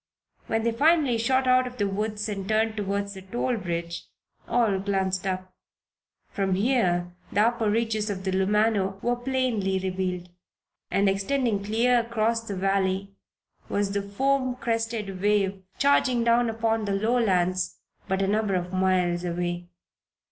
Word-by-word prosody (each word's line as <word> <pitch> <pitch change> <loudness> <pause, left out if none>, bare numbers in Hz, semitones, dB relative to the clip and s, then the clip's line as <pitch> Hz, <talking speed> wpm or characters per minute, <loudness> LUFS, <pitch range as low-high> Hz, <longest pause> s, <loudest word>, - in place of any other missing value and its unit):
When 225 0 0
they 235 - +2
finally 285 -1 +3
shot 260 +3 +2
out 255 0 +4
of 250 0 -9
the 205 -3 +1
woods 210 +2 -2
and 195 -2 -4
turned 220 0 +1
toward 200 -1 -2
the 195 -1 -8
toll 240 +6 -2
bridge, 170 -3 -4 0.4
all 225 -6 +2
glanced 190 -1 -1
around. 185 0 -2 0.9
From 195 -2 0
here 185 -6 +1 0.2
the 205 - +2
upper 230 -1 +2
reaches 220 -1 0
of 190 -2 -4
the 190 - -1
Lumano 195 0 +1
were 240 +1 +2
plainly 245 -6 0
revealed. 185 -1 -3 0.6
And 200 0 +2
extending 200 +2 0
clear 235 +4 +3
across 230 0 0
the 210 -3 -5
valley 195 0 0 0.6
was 200 -1 0
the 200 0 0
foam 255 +5 0
crested 225 -5 -2
wave 200 -2 +1 0.2
charging 260 -4 +3
down 235 0 +3
upon 225 -1 0
the 200 - -1
lowlands, 190 -5 +1 0.3
but 190 +1 0
a - - +1
number 210 -1 +1
of 180 0 -3
miles 180 -2 +1
away. 175 0 -3
205 Hz, 150 wpm, -26 LUFS, 190-230 Hz, 0.9 s, out